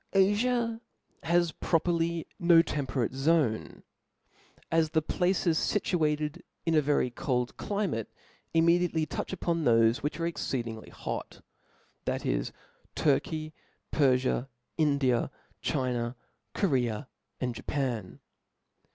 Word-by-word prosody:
Afia 230 +4 +2 0.4
has 170 0 +2
properly 165 0 0 0.2
nq 170 -1 +7
temperate 130 -4 -1
zoni:, 135 -5 +1 0.9
as 165 -1 +3
the 160 0 +2
places 180 -1 +1
fituated 155 -6 0 0.2
in 165 - +2
^ 155 - +5
yery 140 -4 +1
cqld 125 -1 -1
climate 200 - -2 0.4
immediately 170 0 +3
touch - - -4
upon 170 -3 -1
thofe 115 -2 +4
which 150 +3 -3
are 165 - 0
exceeding 120 -9 -3
hot, - - -6 0.6
that - - -2
is - - 0 0.4
Turky^ 155 +2 0 0.4
jpierfia, 130 -2 +2 0.3
India^ 140 -5 +2 0.3
China, 125 -2 -1 0.4
Cprea| 125 - +1 0.3
and 125 -1 -1
Japan. 120 -5 -3
155 Hz, 100 wpm, -29 LUFS, 125-170 Hz, 0.9 s, nq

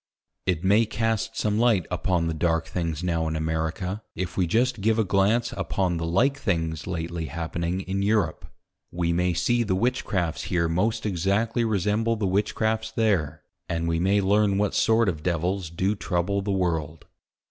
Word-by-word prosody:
It 90 -2 0
may 105 +4 +4
cast 115 0 -1
some 105 0 0
Light 115 -7 +3
upon 90 -1 0
the 80 - -1
Dark 80 +1 0
things 85 -1 -3
now 85 -2 0
in 80 - -2
America, 80 +5 -2
if 95 -2 -4
we 90 -2 +1
just 115 +4 +1
give 110 +2 +2
a 110 - +3
glance 100 +5 +2
upon 90 -3 -1
the 80 0 -2
like 135 +11 +2
things 80 - -1
lately 85 -2 -3
happening 85 +3 -3
in 95 +1 -2
Europe. 100 -5 0 0.4
We 85 -1 0
may 90 0 +1
see 120 +7 +2
the 100 -5 0
Witchcrafts 95 -6 -1
here 85 -2 +1
most 110 +7 0
exactly 105 +5 0
resemble 110 +2 +1
the 105 -2 -2
Witchcrafts 110 +3 0
there; 80 -9 0 0.3
and 85 0 -1
we 80 0 0
may 100 +3 +3
learn 100 0 +3
what 105 0 +1
sort 115 0 +3
of 80 -5 -1
Devils 90 +1 -1
do 95 +5 0
trouble 100 0 -1
the 100 +1 -2
World. 80 -4 -1
95 Hz, 170 wpm, -25 LUFS, 85-105 Hz, 0.4 s, may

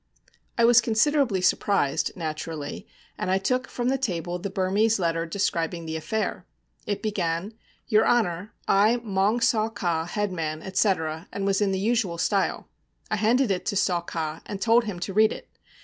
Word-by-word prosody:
I 235 - +5
was 240 0 +7
considerably 235 -2 +2
surprised, 160 -6 +1
naturally, 155 -3 -5 0.3
and - - -2
I 190 - +3
took 255 +6 0
from 245 0 -2
the 270 0 0
table 180 -7 -2
the 200 - -4
Burmese 200 +4 +1
letter 165 -2 -1
describing 170 -2 -1
the 160 0 -4
affair. 215 +7 -3 0.4
It 205 - -2
began, 190 -1 -2 0.3
'Your 215 -2 +4
honour, 205 -4 +1 0.2
I, 215 +5 +4
Maung 205 +3 +1
Saw 220 -1 +2
Ka, 170 -7 -1
headman,' 170 -5 -3
etc., 185 -4 0
and 195 - -3
was 195 +1 +1
in 200 -1 +2
the 190 - 0
usual 205 -4 0
style. 200 +3 0 0.4
I 215 - +1
handed 230 +3 +2
it 185 -1 -1
to - - 0
Saw 180 -3 +1
Ka, 160 -2 -4
and 200 - -5
told 230 +3 +3
him 200 -5 -5
to 195 - -3
read 215 +2 +5
it. - - -8
195 Hz, 170 wpm, -25 LUFS, 170-220 Hz, 0.4 s, was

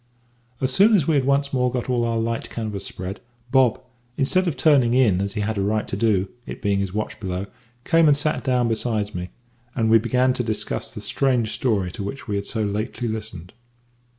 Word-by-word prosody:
As 130 -1 0
soon 210 - +6
as 170 -8 +3
we 160 - +3
had 140 -3 +2
once 140 +1 +1
more 125 -1 +1
got 125 -1 -3
all 125 -2 +1
our 115 -1 0
light 115 0 -2
canvas 110 -4 -4
spread, 95 +2 -6 0.3
Bob, 130 -2 +4 0.4
instead 185 +7 +2
of 150 -6 -2
turning 130 -5 +4
in 105 -8 +3
as 100 0 -2
he 105 - -2
had 105 0 -1
a - - +1
right 105 +2 0
to - - -3
do, 100 -3 +1 0.2
it - - -7
being 100 -1 0
his 100 -2 -2
watch 105 +1 -4
below, 95 -2 -3 0.4
came 165 -1 +4
and 145 -1 +5
sat 155 +1 -1
down 125 -2 +2
beside 110 -2 -1
me, 90 0 -5 0.5
and 110 -2 +1
we 115 - +7
began 125 +3 +2
to 125 - -2
discuss 110 -2 -3
the - - -7
strange 125 -5 +1
story 100 -8 0
to 105 - -7
which 100 +8 -6
we 105 - -2
had 100 0 -3
so 110 -2 -1
lately 105 +4 -3
listened. 110 -6 -6
115 Hz, 215 wpm, -23 LUFS, 105-130 Hz, 0.5 s, we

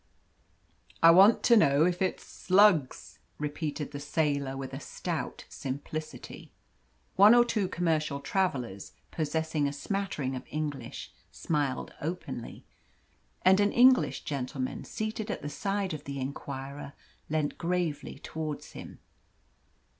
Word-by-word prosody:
"I 165 - +10
want 195 +6 +6
to 235 - +6
know 145 -7 +5
if 180 0 0
it's 185 - 0
slugs," 185 -7 +2 0.2
repeated 150 0 -4
the 145 - -6
sailor, 145 -2 -1
with 135 -1 -6
a 135 - -4
stout - - -5
simplicity. 155 +3 -6 0.7
One 205 +4 +8
or 240 0 +6
two 215 -5 0
commercial 155 -5 0
travellers, 135 - -2 0.2
possessing 160 -1 -1
a - - -2
smattering 145 -4 -3
of 130 - -4
English, 145 -5 -5 0.2
smiled 145 -5 -2
openly, 155 -7 -5 0.8
and 190 +1 +6
an 205 0 +3
English 255 +1 +5
gentleman 130 -2 -4
seated 215 0 -4
at - - -4
the 145 - -3
side 195 +2 -2
of 150 -2 -7
the 140 0 -5
inquirer 140 +1 -6 0.4
leant 155 -1 -1
gravely 170 -4 -2
towards 155 -2 -6
him. - - -10
155 Hz, 125 wpm, -29 LUFS, 140-185 Hz, 0.8 s, I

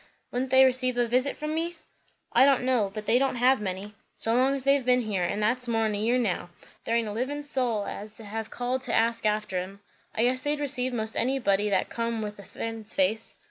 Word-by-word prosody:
"Would 255 +2 -2
they 265 +1 +7
receive 255 -1 +1
a 240 -1 +2
visit 255 +4 +1
from 305 0 -3
me?" 335 +2 -2 0.6
"I 245 - +6
don' 270 -2 +4
know; 245 -6 +2
but 215 +1 -6
they 240 - +4
don't 270 -1 +1
have 250 0 +3
many. 195 +1 -4 0.2
So 225 - -1
long 260 +3 +3
as 270 - -4
they've 275 0 +3
been 250 0 +3
here, 200 -5 -1
and 205 +4 -1
that's 250 +3 0
more'n 225 -2 +1
a 205 - -2
year 235 +4 +2
now, 205 -7 -1 0.4
there 230 - 0
aint 230 -1 +1
a - - -3
livin' 265 +7 -3
soul 250 -7 -1
as 210 +1 -7
has 220 0 -5
called 250 +2 -2
to 250 -2 -1
ask 230 -1 +2
after 210 -3 0
'em. 190 +2 -7 0.4
I 225 - +2
guess 255 +1 +2
they'd 290 +2 -1
receive 260 -3 -1
most 220 -2 -3
anybody 210 -5 +1
that 195 -2 +1
come 230 -1 -2
with 210 -1 -6
a - - -9
friend's 225 +1 -4
face. 210 +4 0
235 Hz, 225 wpm, -27 LUFS, 215-255 Hz, 0.6 s, they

